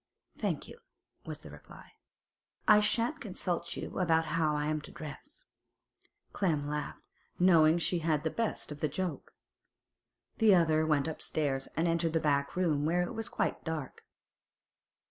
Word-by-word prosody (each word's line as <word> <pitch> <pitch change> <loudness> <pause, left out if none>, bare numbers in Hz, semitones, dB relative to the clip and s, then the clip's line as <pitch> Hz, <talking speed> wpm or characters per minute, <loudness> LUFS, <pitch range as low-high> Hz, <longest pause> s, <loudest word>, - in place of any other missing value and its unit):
'Thank - - -2
you,' 470 - -12 0.5
was - - -6
the - - -11
reply. - - -14 0.8
'I 210 -1 +8
shan't 235 +8 0
consult 180 -4 -3
you - - -5
about 165 -3 +3
how 155 -1 +1
I'm 150 +1 -1
to - - -11
dress.' 170 - -10 0.9
Clem 155 -7 0
laughed, 150 0 -4 0.3
knowing 165 -3 +5
she 170 +1 0
had 155 -2 0
the 160 - -1
best 230 -8 -2
of 150 - -7
the 155 - +1
joke. 175 +4 -4 1.0
The 215 -4 +6
other 160 -2 +3
went 150 -1 +2
upstairs, 145 -3 -2
and 165 +2 +2
entered 165 -1 +1
the 160 - +3
back 140 -2 0
room, 160 -6 +1
where 175 +3 +2
it 175 - -4
was 225 +1 -2
quite - - -2
dark. 160 -5 -5
160 Hz, 150 wpm, -31 LUFS, 150-180 Hz, 1.0 s, I